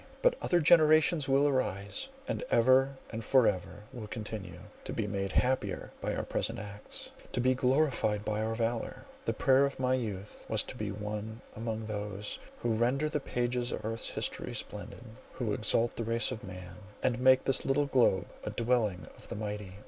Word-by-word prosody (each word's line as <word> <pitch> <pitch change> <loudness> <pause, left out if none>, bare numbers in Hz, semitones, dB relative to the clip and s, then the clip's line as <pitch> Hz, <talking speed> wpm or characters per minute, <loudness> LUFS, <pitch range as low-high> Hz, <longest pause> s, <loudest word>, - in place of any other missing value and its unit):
But - - +5
other 175 -1 +2
generations 155 -1 +5
will 140 +2 +4
arise, 100 - -1 0.2
and - - -2
ever 130 +3 +4 0.2
and 115 0 -4
for 130 +1 +5
ever 95 +1 -1
will 115 -4 -6
continue, 105 -6 -6 0.2
to - - -5
be 110 - -1
made 100 -2 -2
happier 130 +1 0
by - - -1
our - - -2
present 115 - -2
acts, 105 -1 -5 0.2
to - - 0
be 130 +1 +4
glorified 130 -5 +1
by 105 0 -1
our 110 +1 -1
valour. 115 0 -2 0.2
The - - +1
prayer 135 +1 +5
of 140 -1 -1
my 130 0 +2
youth 105 -5 -4
was 110 -1 +1
to - - -7
be 105 -4 -3
one 105 +3 -5
among 110 0 -3
those 105 -1 -4 0.2
who 120 -1 +2
render 125 +7 +1
the 150 - -1
pages 120 -2 -1
of - - -4
earth's 115 +1 -1
history - - -2
splendid; - - -6 0.3
who - - -2
exalt 115 +1 +3
the 115 - -2
race 115 +1 0
of 115 -4 -5
man, 90 -2 -9 0.3
and 120 -1 +1
make 130 0 +6
this 135 -1 +2
little 145 +2 +2
globe 125 -9 +3 0.2
a - - -3
dwelling 115 -6 0
of - - -13
the - - -5
mighty. 105 -2 -5
115 Hz, 185 wpm, -31 LUFS, 105-130 Hz, 0.3 s, make